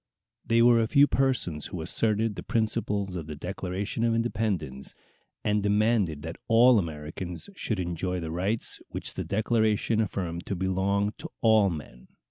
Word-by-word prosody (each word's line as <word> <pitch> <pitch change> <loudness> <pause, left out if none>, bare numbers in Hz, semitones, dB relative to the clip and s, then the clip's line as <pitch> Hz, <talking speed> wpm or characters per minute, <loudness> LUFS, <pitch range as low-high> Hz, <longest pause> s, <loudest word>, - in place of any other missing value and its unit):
They 115 +1 +3
were 120 -1 +6
a 110 - +1
few 140 +5 +6
persons 130 - 0
who 90 - -6
asserted 110 +6 0
the - - -7
principles 105 -4 -1
of 80 -4 -5
the 75 - -6
Declaration 95 +6 -3
of 115 -1 +2
Independence, 105 - -2 0.5
and 105 0 +1
demanded 105 -6 +1
that 80 +1 -6
all 120 +1 +6
Americans 85 - -6
should 110 - -2
enjoy 90 +1 -2
the 80 -2 -5
rights 95 +7 -1
which - - -3
the - - -3
Declaration 110 +1 +1
affirmed 90 -5 -3
to 100 - -2
belong 95 +3 0
to - - -6
all 110 -3 +5
men. 75 -7 -8
100 Hz, 155 wpm, -27 LUFS, 85-110 Hz, 0.5 s, were